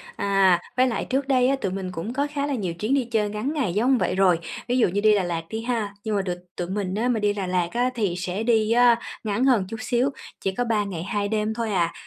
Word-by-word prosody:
À, 195 -3 +3 0.2
với 255 +1 +5
lại 230 - -2
trước 270 +1 -1
đây 255 -2 +3
á, 275 - +3
tụi 195 - -1
mình 190 -1 -4
cũng 180 +7 -5
có 285 +2 0
khá 285 -1 -1
là 285 - -1
nhiều 185 -7 -2
chuyến 215 +9 -2
đi 270 -3 +2
chơi 220 -3 0
ngắn 215 +8 -3
ngày 260 - -1
giống 250 +5 +3
vậy 180 - 0
rồi, 185 -3 +4 0.3
ví 245 - +1
dụ 245 - +4
như 200 +3 -1
đi 215 0 +5
Đà 200 - +1
Lạt 170 -2 -2
đi 220 0 -4
ha, 225 -4 -2
nhưng 220 -2 -1
mà 200 - +2
được 180 -2 -3 0.2
tụi 175 - -3
mình 190 -1 -2
á 225 +4 0
mà 235 -3 +1
đi 205 -1 +1
Đà 195 -3 -3
Lạt 180 -1 +1
á 245 +2 +2
thì 205 -7 0
sẽ 185 +3 -3
đi 225 -2 +2
á 240 0 +6 0.3
ngắn 220 +3 0
hơn 260 -3 +5
một 190 - -3
chút 225 - -5
xíu, 245 +3 +1 0.3
chỉ 195 - 0
có 245 - -1
3 220 -3 +1
ngày 175 -4 -5
2 205 +1 -1
đêm 215 +1 -1
thôi 230 -1 -2
à. 170 -4 +1
210 Hz, 285 wpm, -24 LUFS, 190-240 Hz, 0.3 s, á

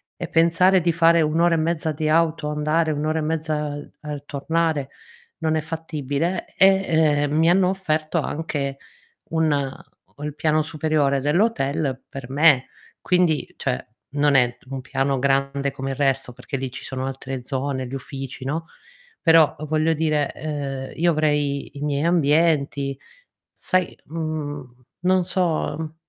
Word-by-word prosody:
e 175 -2 -5
pensare 175 +3 +4
di 170 0 +2
fare 165 0 +5
1 155 +2 +1
ora 170 -1 +4
e - - +1
mezza 160 0 0
di 155 +1 -2
auto, 160 -1 +2
andare 155 +2 +1
1 150 +1 -2
ora 160 +1 0
e - - -1
mezza 155 0 -1
al 145 0 -6
al 150 -2 -6
tornare 155 -1 -1 0.5
non 160 -1 +1
è 155 - +1
fattibile. 160 +1 -3
E, 160 -6 +4
uhm, 150 - 0
mi 165 +1 +4
hanno 185 0 +4
offerto 160 -3 -1
anche 145 -3 -3 0.5
un 160 -2 +2
ho 140 +1 -5
il 150 -1 -4
piano 155 0 +2
superiore 150 -3 +1
dell'hotel 145 - 0
per 135 -2 -8
me, 145 -2 +4 0.3
quindi, 180 -4 +1
cioè, 65 - -2 0.3
non 145 0 +2
è 125 -1 +3
t - - -27
un 135 -1 -4
piano 135 0 0
grande 140 +1 +1
come 135 0 -4
il 135 - -3
resto 135 -2 0
perché 125 +2 -6
lì 130 -1 -4
ci 130 - -9
sono 130 0 -4
altre 135 -1 -5
zone, 130 -1 -2
gli 130 - -7
uffici, 135 -1 -7
no, 160 +4 -3 0.5
però 165 -3 +5
voglio 155 +1 +2
dire, 155 -2 0
uhm, 140 -3 -4
io 170 0 +4
avrei 150 -3 0
i - - -8
miei 145 +1 0
ambienti. 150 -4 +2 0.6
Sai, 185 -1 0
mhmm, 145 -5 -5 0.2
non 185 0 +3
so, 175 -4 0
mhmm, 160 -1 -6
150 Hz, 160 wpm, -23 LUFS, 140-165 Hz, 0.6 s, fare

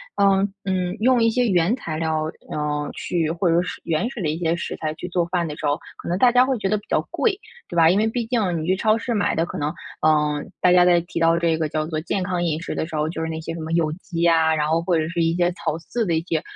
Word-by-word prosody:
呃， 195 0 +3 0.2
嗯， 185 -2 -1
用 250 +2 +3
一 230 - +4
些 245 +2 +1
原 180 +2 +2
材 165 -11 -5
料， 160 -1 0 0.3
呃， 150 -1 -2
去 165 -3 -1
或 170 +2 0
者 165 +1 +3
是 180 - -6
原 165 +8 0
始 245 -5 -7
的 160 - 0
一 155 - -2
些 165 -1 0
食 170 - -4
材 155 -1 -3
去 175 - -6
做 175 -1 +1
饭 175 -1 -1
的 150 - -5
时 155 - -6
候， 145 0 +2 0.2
可 - - -10
能 175 - 0
大 245 +5 +5
家 250 +1 +5
会 265 -1 0
觉 210 - -2
得 210 - +2
比 205 - -10
较 - - +2
贵， 410 -4 0 0.3
对 175 - -8
吧？ 165 -1 +6
因 185 - +3
为 215 +2 +2
毕 230 +1 -2
竟 220 -7 0
你 - - -4
去 185 +3 +2
超 215 +3 +2
市 235 +1 -3
买 205 -2 +1
的 165 - +1
可 - - -7
能， 150 +2 -2 0.3
嗯， 150 -1 +1
大 180 - +5
家 180 0 +6
在 175 -1 +5
提 170 0 -5
到 165 0 +4
这 170 -1 +1
个 160 -1 -1
叫 155 +1 -1
做 155 -1 -3
健 190 +3 -2
康 180 -1 -1
饮 160 -2 -1
食 - - -4
的 - - -1
时 165 - -7
候， 150 0 0
就 160 - -4
是 160 - -2
那 160 0 -4
些 165 +1 -5
什 165 - -7
么 160 +1 -5
有 165 -2 +2
机 170 -1 -2
啊， 160 -1 +4
然 150 -1 0
后， 160 +2 +1
或 170 0 +1
者 155 0 0
是 170 0 -1
一 165 0 +2
些 175 0 +2
草 160 -3 -3
饲 225 +7 -3
的 170 - 0
一 160 - +1
些， 165 -2 -2
170 Hz, 320 characters per minute, -22 LUFS, 160-195 Hz, 0.3 s, 吧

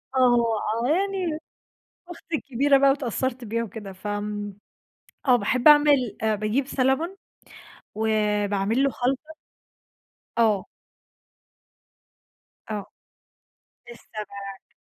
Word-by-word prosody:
آه 240 -4 +3 0.3
آه - - +1
يعني 365 -2 0 0.7
أختي 340 -1 -6
الكبيرة 275 0 +2
بقى 275 0 +5
واتأثّرت 260 -2 -1
بيها 230 +2 -1
وكده، 210 -3 -8
فآمم 205 0 -4 0.7
آه 250 - +7
باحب 250 +3 +2
اعمل 290 -5 +5
آآ 220 -1 +2
باجيب 215 +6 -1
salmon 275 +8 0 0.8
وباعمل 210 +1 +1
له 275 - +3
خلطة 265 +6 -2 1.1
آه. 215 -4 +2 2.0
آه. 205 -2 -3 1.1
السمك. 200 -4 -9
240 Hz, 90 wpm, -25 LUFS, 210-275 Hz, 2.0 s, آه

